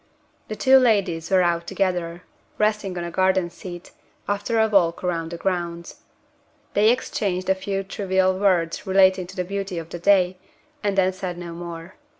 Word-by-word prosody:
The 215 - -5
two 265 +4 +6
ladies 195 -9 +1
were 190 -2 +4
out 170 -1 0
together; 180 -3 -2 0.3
resting 210 -3 0
on 175 - -3
a 170 - -5
garden 185 -1 +1
seat, 175 0 -10 0.4
after 205 +3 -1
a 220 - +4
walk 185 -6 +2
round 165 -2 -2
the 170 - -6
grounds. 170 -2 -3 0.8
They 210 +2 +4
exchanged 190 -6 -1
a - - +6
few 195 +1 -3
trivial 190 -1 0
words 180 -5 +1
relating 190 -1 +4
to - - -12
the 180 - -2
beauty 195 -1 -4
of 165 -1 -6
the 175 - -7
day, 185 -1 +3 0.5
and 200 -1 0
then 190 -1 +3
said 185 -2 -5
no 175 -1 -7
more. 170 +1 -8
185 Hz, 170 wpm, -23 LUFS, 175-195 Hz, 0.8 s, two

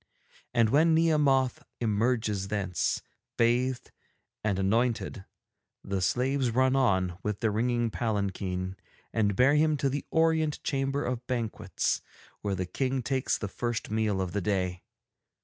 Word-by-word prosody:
And 115 -3 +3
when 160 +3 +5
Nehemoth 145 -6 +3 0.2
emerges 110 -3 0
thence, 100 -4 -1 0.3
bathed 120 +2 +1 0.5
and 105 -3 +1
anointed, 105 0 0 0.6
the 100 -1 -2
slaves 130 +6 +1
run 130 +3 +3
on 95 -8 +2
with 105 0 -3
their 110 - +2
ringing 120 +1 0
palanquin 95 -4 -2 0.4
and 105 -3 +1
bear 130 +7 +5
him 155 0 +3
to 140 - +1
the 140 +1 -2
Orient 160 -2 +2
Chamber 135 0 -1
of 125 -1 -3
Banquets, 110 -5 -1 0.4
where 100 -2 -1
the 95 0 -2
King 130 +7 -1
takes 130 +1 0
the 105 - -4
first 120 +2 -3
meal 110 -3 +1
of 90 -2 -2
the 100 - -1
day. 90 -2 -1
115 Hz, 135 wpm, -29 LUFS, 100-130 Hz, 0.6 s, when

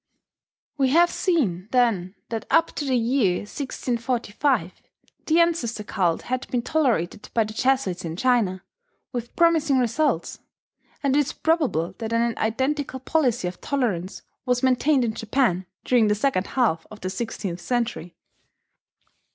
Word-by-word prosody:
We 265 -1 +3
have 345 +5 +5
seen, 215 - 0
then, 220 -7 +1
that 225 -1 -4
up 330 0 +3
to 295 - -2
the 265 -2 +1
year 230 -6 +1
1645 240 - -2 0.5
the 325 +2 +4
ancestor 290 -11 +1
cult 180 -5 0
had 255 0 -3
been 245 -2 -1
tolerated 230 - 0
by 230 - +4
the 215 0 -7
Jesuits 240 -7 0
in 165 -1 -4
China, 210 -5 +1 0.5
with 240 -2 -5
promising 320 -5 +3
results; 260 +5 0 0.6
and 275 -1 +2
it - - +5
is 295 +2 0
probable 265 - 0
that 225 -1 -3
an 230 0 +1
identical 260 +5 -1
policy 255 - +1
of 180 0 -7
tolerance 200 - -2 0.2
was 250 0 0
maintained 260 +1 +3
in 220 - -1
Japan 220 -5 0 0.2
during 240 -4 +4
the 210 - +2
second 210 -4 0
half 220 -11 +1
of 215 - -12
the 185 - -3
sixteenth 190 -4 -4
century. 230 -9 -2
240 Hz, 145 wpm, -24 LUFS, 205-270 Hz, 0.6 s, have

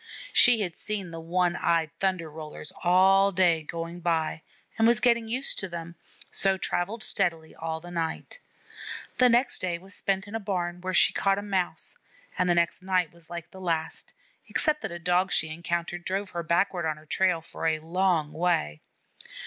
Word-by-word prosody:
She 240 -3 +6
had 175 -5 -2
seen 200 -5 -4
the 165 - -6
one 175 +1 +1
eyed 165 -2 +1
Thunder 185 -4 0
rollers 150 -1 -9
all 190 +2 +5
day 175 -3 +3
going 165 +2 -6
by, 165 -2 0 0.3
and 225 - +4
was 235 -2 +4
getting 235 -2 +3
used 255 +4 -1
to 190 - -3
them, 170 0 -6 0.4
so 195 -1 +2
travelled 200 +5 -2
steadily 165 -5 0
all 160 0 -4
that 175 +1 -10
night. 165 - -3 0.8
The 250 -1 +7
next 240 +3 +3
day 175 -2 -1
was 190 +3 -12
spent 195 0 -1
in 205 - -10
a 225 - -1
barn 180 -4 -3
where 185 0 -2
she - - +6
caught 195 0 +2
a 200 - -3
Mouse, 190 -3 -2 0.4
and 180 0 +1
the 175 - +4
next 170 +1 +1
night 185 -3 0
was 170 -1 -17
like 170 -1 -7
the 190 - -11
last, 165 -3 -2 0.3
except 300 -1 +2
that - - -4
a 175 - -5
Dog 180 +2 +1
she 160 - +1
encountered 170 +1 -3
drove 195 +1 -2
her 170 - -3
backward 170 +1 +1
on 155 -1 -2
her 155 - -16
trail 180 +2 +2
for 165 0 -4
a 160 -1 +2
long 165 -1 0
way. 155 - 0
175 Hz, 190 wpm, -27 LUFS, 165-195 Hz, 0.8 s, The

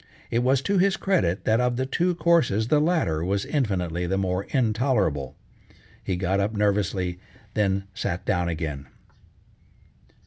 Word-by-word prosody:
It 115 - +2
was 130 +2 +2
to 200 -1 +1
his 195 +2 +3
credit, 95 - 0
that 110 +2 +3
of 125 -1 +1
the 130 +2 -1
two 175 +6 0
courses 155 - +2
the 150 - +4
latter 150 - +1
was 100 +3 -1
infinitely 90 - -1
the 95 +2 0
more 95 0 -1
intolerable. 110 - 0 0.7
He 95 - -1
got 95 +2 0
up 100 +2 0
nervously, 95 -3 0 0.3
then 100 -2 +1
sat 90 -2 -3
down 90 -4 0
again. 75 -4 -4
100 Hz, 145 wpm, -25 LUFS, 90-130 Hz, 0.7 s, the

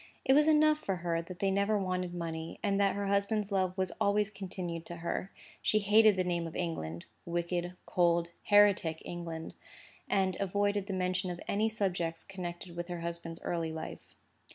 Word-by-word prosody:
It 265 - +5
was 300 +2 +5
enough 305 0 +5
for 195 -11 -2
her 165 -1 +1
that 175 +1 -9
they 195 +1 +1
never 200 +2 +2
wanted 185 -2 -2
money, 165 -1 -4
and 200 -1 +2
that 200 -1 +3
her 200 0 -2
husband's 200 +1 +1
love 185 -1 +1
was 185 -1 0
always 205 +1 +3
continued 180 -4 -5
to 175 - -6
her. 170 +2 -3 0.3
She 215 - +3
hated 215 0 +6
the 185 - +1
name 175 -2 -1
of 160 - -9
England—wicked, 170 - -3
cold, 170 -1 +2 0.2
heretic 200 -6 +4
England—and 175 +2 -4
avoided 200 +1 0
the 195 - -2
mention 185 0 0
of 175 -1 -5
any 215 +2 +2
subjects 180 -6 -1
connected 175 -2 -7
with 175 0 -4
her 175 -2 -5
husband's 170 -1 -5
early 165 -2 -1
life. 160 0 -7
185 Hz, 170 wpm, -32 LUFS, 170-200 Hz, 0.3 s, hated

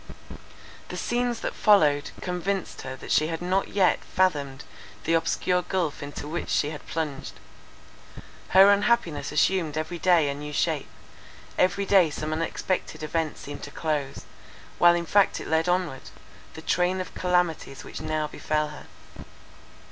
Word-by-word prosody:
The - - -5
scenes 240 -1 -1
that - - -3
followed, 150 -9 +4
convinced 180 +1 -3
her 130 0 -6
that 130 - -9
she 155 - +3
had 165 0 -3
not 185 +2 0
yet 190 -3 +2
fathomed 145 -7 0 0.4
the 165 - 0
obscure 180 +2 +1
gulph 175 -5 -2
into 145 0 -7
which 170 +3 -4
she 150 - +1
had 150 - -9
plunged. 145 -4 -4 1.2
Her 195 +2 +8
unhappiness 200 -10 +1
assumed 155 0 +1
every 160 +2 -3
day 170 -4 +4
a 140 - -1
new 150 +1 -7
shape; - - 0 0.7
every 195 +2 +2
day 190 -4 +5
some 155 +1 -4
unexpected 165 +1 -2
event 160 0 -2
seemed 145 0 -8
to - - -7
close, 150 -4 -3 0.5
while 175 0 +7
in 170 0 -2
fact 200 +3 +3
it - - -7
led 160 +2 +1
onward, 175 -7 -1 0.5
the 160 - -9
train 180 +3 +1
of 185 - -5
calamities 180 -6 0
which - - -8
now 155 -1 -1
befell 150 0 -2
her. 150 - -11
165 Hz, 150 wpm, -26 LUFS, 150-185 Hz, 1.2 s, Her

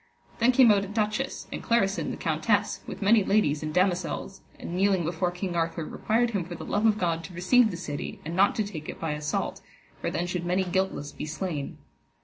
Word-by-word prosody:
Then 235 +2 +5
came 245 -3 +7
out 200 -1 +3
a - - -5
duchess, 215 +5 -2
and - - -4
Clarisin 200 -4 +1
the - - -4
countess, 195 +6 +1
with 200 - -6
many 210 +1 +5
ladies 190 -8 +2
and 155 0 -3
damosels, 185 +2 0 0.2
and 170 - -6
kneeling 190 -1 +2
before 170 +2 0
King 180 0 -4
Arthur, 165 -1 -1
required 230 +7 0
him 200 -5 -1
for 175 +1 -7
the - - -8
love 210 +2 +2
of 215 -1 +3
God 165 -4 0
to 180 - -10
receive 220 +7 +4
the 180 - -5
city, 150 -5 -5
and 165 +2 -4
not 195 +2 +4
to 215 - +1
take 165 -7 -7
it - - -6
by 160 - -2
assault, 150 0 -2 0.4
for - - -2
then 175 - -1
should 180 -1 -3
many 180 +2 +1
guiltless 185 -5 -1
be - - -6
slain. 155 -2 -4
185 Hz, 215 wpm, -27 LUFS, 165-205 Hz, 0.4 s, came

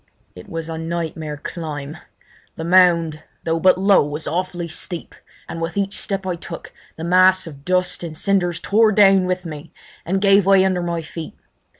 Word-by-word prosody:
It 90 - -12
was 165 -1 -5
a 160 -1 -5
nightmare 160 -2 -4
climb. 150 -2 -6 0.6
The 160 - -6
mound, 170 -3 +4 0.2
though 165 0 0
but 185 +2 +4
low, 195 +1 +4
was 145 +2 -5
awfully 175 0 -2
steep, 170 +1 -6 0.3
and 165 - -6
with 165 +4 -4
each 200 0 -1
step 195 -1 -3
I 180 -2 -1
took 170 - -9 0.2
the 160 - -6
mass 185 +2 +4
of 140 -4 -11
dust 180 +1 0
and 160 -2 -6
cinders 175 -2 0
tore 215 +1 +3
down 195 -3 +5
with 185 0 -2
me 150 -2 -8 0.3
and 190 +3 -1
gave 200 0 +5
way 195 -1 +5
under 185 -2 0
my 170 -1 -3
feet. 160 0 -8
175 Hz, 180 wpm, -20 LUFS, 160-185 Hz, 0.6 s, down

